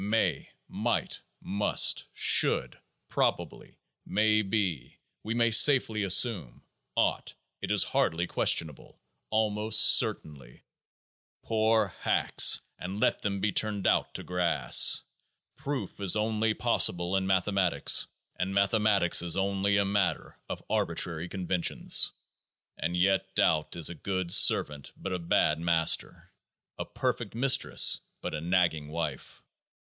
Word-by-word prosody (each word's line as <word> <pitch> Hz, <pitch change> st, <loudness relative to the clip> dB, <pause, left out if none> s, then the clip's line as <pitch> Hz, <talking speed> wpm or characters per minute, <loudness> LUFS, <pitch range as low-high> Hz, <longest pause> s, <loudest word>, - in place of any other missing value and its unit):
May, 95 Hz, -9 st, -1 dB, 0.2 s
might, -, -, -3 dB, 0.2 s
must, 100 Hz, +1 st, +2 dB
should, -, -, +2 dB, 0.3 s
probably, -, -, -3 dB, 0.3 s
may 110 Hz, +1 st, +1 dB
be, 95 Hz, -, -4 dB, 0.3 s
we 110 Hz, +2 st, -4 dB
may 115 Hz, -1 st, +1 dB
safely 115 Hz, -2 st, +3 dB
assume, 95 Hz, -, +1 dB, 0.3 s
ought, -, -, -2 dB, 0.3 s
it -, -, -5 dB
is -, -, +3 dB
hardly 85 Hz, +2 st, -1 dB
questionable, 80 Hz, -4 st, -2 dB, 0.3 s
almost 110 Hz, 0 st, 0 dB
certainly 70 Hz, -5 st, +1 dB, 0.4 s
— -, -, -70 dB
poor 110 Hz, -1 st, 0 dB
hacks! -, -, +3 dB, 0.2 s
let 95 Hz, +4 st, -2 dB
them 100 Hz, -1 st, -4 dB
be 105 Hz, -, 0 dB
turned 105 Hz, -1 st, -2 dB
out -, -, 0 dB
to -, -, -6 dB
grass! 85 Hz, -8 st, +2 dB, 0.5 s
Proof 135 Hz, -7 st, -6 dB
is 100 Hz, -1 st, +3 dB
only 110 Hz, 0 st, -1 dB
possible 85 Hz, +1 st, 0 dB
in 95 Hz, 0 st, -1 dB
mathematics, 95 Hz, -1 st, +1 dB, 0.3 s
and 95 Hz, +1 st, -4 dB
mathematics 100 Hz, -3 st, +2 dB
is 85 Hz, -1 st, -2 dB
only 100 Hz, +1 st, -1 dB
a 100 Hz, -, +1 dB
matter 100 Hz, -2 st, -2 dB
of -, -, -7 dB
arbitrary 85 Hz, 0 st, -2 dB
conventions. 90 Hz, -2 st, 0 dB, 0.6 s
And 85 Hz, +3 st, -4 dB
yet 95 Hz, +1 st, 0 dB
doubt 75 Hz, -1 st, 0 dB
is 85 Hz, -3 st, +1 dB
a -, -, -7 dB
good 95 Hz, +1 st, -3 dB
servant 75 Hz, -2 st, +2 dB
but 95 Hz, -, -6 dB
a 90 Hz, -, -3 dB
bad 80 Hz, -2 st, 0 dB
master; 85 Hz, -1 st, -1 dB, 0.5 s
a -, -, -4 dB
perfect -, -, -4 dB
mistress, 130 Hz, +3 st, +3 dB, 0.2 s
but -, -, -7 dB
a 75 Hz, -, -5 dB
nagging 85 Hz, -3 st, -1 dB
wife. 75 Hz, -3 st, -7 dB
95 Hz, 120 wpm, -27 LUFS, 85-105 Hz, 0.6 s, safely